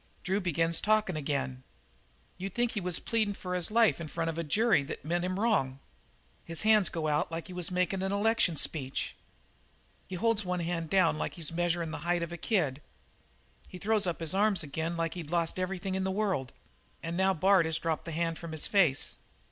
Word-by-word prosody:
Drew 190 +2 0
begins 165 -2 +1
talkin' 215 -4 +2
again. 140 -3 -2 0.8
You'd 190 0 -5
think 240 -1 +2
he 210 - -3
was 180 -1 0
pleadin' 215 -3 0
for 180 -1 -5
his 180 -2 +1
life 225 -5 +3
in 160 - -5
front 165 +1 -2
of 160 - -9
a - - -1
jury 215 +3 +3
that 140 +1 -7
meant 175 +2 0
him 185 +1 -2
wrong. 205 - +1 0.7
His 165 +1 -4
hands 215 -3 +5
go 160 -2 -2
out 150 +2 0
like 165 0 -4
he 185 - -9
was 180 0 0
makin' 180 +1 0
an 190 0 -1
election 205 -5 +2
speech. 135 -3 -1 0.9
He 185 - -5
holds 225 +3 +1
one 180 -1 -2
hand 165 -1 -2
down 185 -5 +3
like - - -3
he 175 - -10
was 155 - -1
measurin' 170 -1 -1
the - - -4
height 170 +2 0
of 170 - -5
a - - -4
kid. 155 - 0 0.9
He - - -9
throws 210 0 +1
up 170 -1 -2
his 165 0 +3
arms 200 -2 +2
again 160 +4 -3
like 165 -1 -1
he'd 170 -4 -6
lost 170 +1 0
everything 185 +1 -2
in 190 0 -1
the 190 - 0
world. 190 -10 -1 0.5
"And 165 +1 -3
now 190 +1 +3
Bard 185 0 +4
has 160 -1 +1
dropped 165 -1 -2
the 165 - -5
hand 165 0 -1
from 165 -1 -7
his 160 - +1
face. 170 -10 +3
175 Hz, 210 wpm, -30 LUFS, 165-195 Hz, 0.9 s, hands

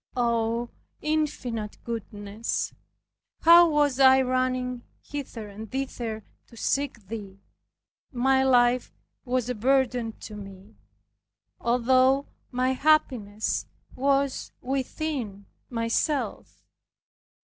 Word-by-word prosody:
Oh, 235 0 +1 0.3
Infinite 255 -8 -2
Goodness! 215 -1 -4 0.7
how 340 +1 +8
was 290 -3 +2
I 265 0 +7
running 255 -1 0 0.2
hither 255 -7 -6
and 210 +2 -9
thither 240 -5 -4 0.2
to 230 - -16
seek 270 -4 -1
Thee, 200 -3 -7 0.7
my 265 +1 +3
life 245 -1 +3 0.3
was 250 -1 0
a 250 - -1
burden 245 -1 +1
to 215 - -8
me, 195 -1 -11 0.9
although 255 +3 +3 0.3
my 255 0 +1
happiness 255 -8 +1 0.3
was 275 0 +1
within 260 -5 -3 0.2
myself. 235 +5 -2
250 Hz, 90 wpm, -26 LUFS, 225-270 Hz, 0.9 s, how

